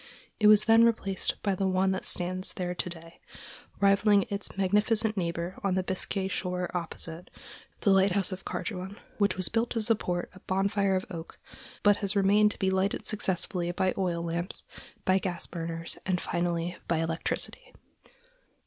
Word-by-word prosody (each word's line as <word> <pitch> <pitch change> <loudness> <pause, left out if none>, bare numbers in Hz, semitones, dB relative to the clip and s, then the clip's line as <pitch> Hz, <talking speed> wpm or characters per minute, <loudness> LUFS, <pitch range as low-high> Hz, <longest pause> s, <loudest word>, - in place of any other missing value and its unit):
It 210 - +5
was 210 0 +7
then 225 +1 +6
replaced 215 -4 0
by 200 - +1
the 190 +1 0
one 190 0 +2
that 190 - -3
stands 185 +1 -3
there 180 -1 -3
to 180 - -2
day, 165 -1 -11 0.6
rivaling 200 0 +4
its 200 -1 -1
magnificent 210 +3 +2
neighbor 170 0 -3
on 195 -2 +1
the 185 - +1
Biscay 190 +1 -1
shore 180 -1 -3
opposite, 170 0 -3 0.5
the 200 - +3
lighthouse 195 0 +4
of 185 0 -6
Carduan, 190 -1 -5 0.2
which 200 -2 +2
was 185 - +1
built 230 +1 0
to 230 - -1
support 180 -5 0
a 185 - -14
bonfire 195 +1 +1
of 185 - -1
oak, 165 -2 -8 0.5
but 205 -1 +5
has 200 0 -1
remained 205 +2 +4
to - - -8
be 190 -1 +1
lighted 190 +2 0
successively 180 -3 -1
by 185 +1 0
oil 175 -3 -1
lamps, 170 +2 -3 0.4
by 190 +1 +4
gas 180 -3 +1
burners, 165 -1 -5
and 180 -1 0
finally 175 0 -2
by 170 - +1
electricity. 165 0 -2
190 Hz, 165 wpm, -28 LUFS, 175-200 Hz, 0.6 s, was